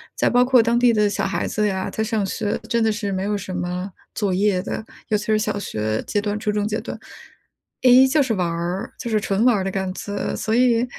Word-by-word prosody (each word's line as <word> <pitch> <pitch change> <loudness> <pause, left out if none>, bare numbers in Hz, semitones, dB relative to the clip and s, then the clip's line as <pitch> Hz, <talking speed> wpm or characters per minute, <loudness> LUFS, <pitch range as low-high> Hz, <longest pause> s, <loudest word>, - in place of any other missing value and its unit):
在 - - +1
包 245 0 +4
括 255 -1 +5
当 235 +1 +2
地 245 -1 +5
的 210 -1 +3
小 200 - -1
孩 195 - -1
子 210 0 0
呀， 190 -2 -2
他 - - -3
上 220 -2 -1
学 205 +2 -2
真 235 -1 +2
的 220 - +3
是 210 -2 -3
没 190 -1 -2
有 205 +1 -1
什 190 -1 -6
么 180 +2 -3 0.2
作 200 -3 0
业 195 0 +2
的， 220 - -4 0.3
尤 215 - +3
其 210 - -6
是 215 -1 +3
小 210 - -1
学 110 - -2
阶 205 - 0
段、 205 0 -2
初 210 - -1
中 210 0 -1
阶 215 +1 -1
段。 - - -7 0.8
诶， 255 +1 +8
就 295 +3 +3
是 250 -4 -1
玩 180 -2 0
儿， 175 +7 -3
就 235 - -4
是 215 -1 +2
纯 200 +3 0
玩 250 -2 +5
儿 190 - -1
的 190 - -2
感 190 0 -2
觉， 205 +1 -4
所 220 - -2
以 245 -1 +3
210 Hz, 270 characters per minute, -22 LUFS, 195-230 Hz, 0.8 s, 诶